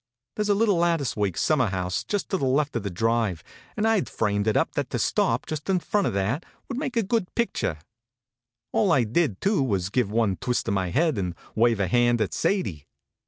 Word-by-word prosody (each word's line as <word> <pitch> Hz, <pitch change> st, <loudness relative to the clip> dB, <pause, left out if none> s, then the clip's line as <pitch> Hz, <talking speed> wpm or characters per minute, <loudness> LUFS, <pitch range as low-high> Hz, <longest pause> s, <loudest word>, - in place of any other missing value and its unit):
There -, -, -2 dB
s 210 Hz, -, 0 dB
a 205 Hz, -, +4 dB
little 205 Hz, -3 st, +3 dB
lattice 165 Hz, -8 st, +1 dB
work 100 Hz, -5 st, -1 dB
sum 155 Hz, -3 st, +2 dB
mer 125 Hz, -, +3 dB
house 90 Hz, -2 st, -2 dB
just 205 Hz, -2 st, -3 dB
to 190 Hz, -, 0 dB
the -, -, -4 dB
left 140 Hz, +2 st, +1 dB
of 115 Hz, -, 0 dB
the 100 Hz, -, -3 dB
drive, 110 Hz, -3 st, 0 dB, 0.3 s
and 215 Hz, +1 st, +2 dB
I 225 Hz, -2 st, +4 dB
d -, -, -4 dB
framed 105 Hz, -1 st, 0 dB
it 110 Hz, -, +3 dB
up -, -, +1 dB
that -, -, -2 dB
to -, -, -2 dB
stop -, -, +1 dB
just 155 Hz, +3 st, -5 dB
in 190 Hz, -, +3 dB
front 205 Hz, +3 st, 0 dB
of -, -, -2 dB
that 105 Hz, -, -1 dB, 0.2 s
would 260 Hz, -1 st, -4 dB
make 260 Hz, -5 st, -3 dB
a 230 Hz, -, +3 dB
good 205 Hz, -1 st, -1 dB
picture. 235 Hz, -, 0 dB
HONK, -, -, -18 dB
HONK! 75 Hz, -, -25 dB, 0.9 s
All 195 Hz, -, +3 dB
I 130 Hz, -, +4 dB
did, 120 Hz, -, 0 dB
too, 195 Hz, -5 st, +2 dB
was 100 Hz, -7 st, -1 dB
give 120 Hz, -3 st, +1 dB
one 105 Hz, -3 st, +1 dB
twist 125 Hz, -2 st, -1 dB
of 105 Hz, -, +1 dB
my 95 Hz, -2 st, 0 dB
head 155 Hz, -, +1 dB
and 90 Hz, -3 st, -3 dB, 0.2 s
wave 115 Hz, -1 st, +3 dB
a 100 Hz, -, +1 dB
hand 120 Hz, +4 st, +3 dB
at 110 Hz, -, -1 dB
Sadie. 95 Hz, -, -1 dB
120 Hz, 245 wpm, -25 LUFS, -, 0.9 s, a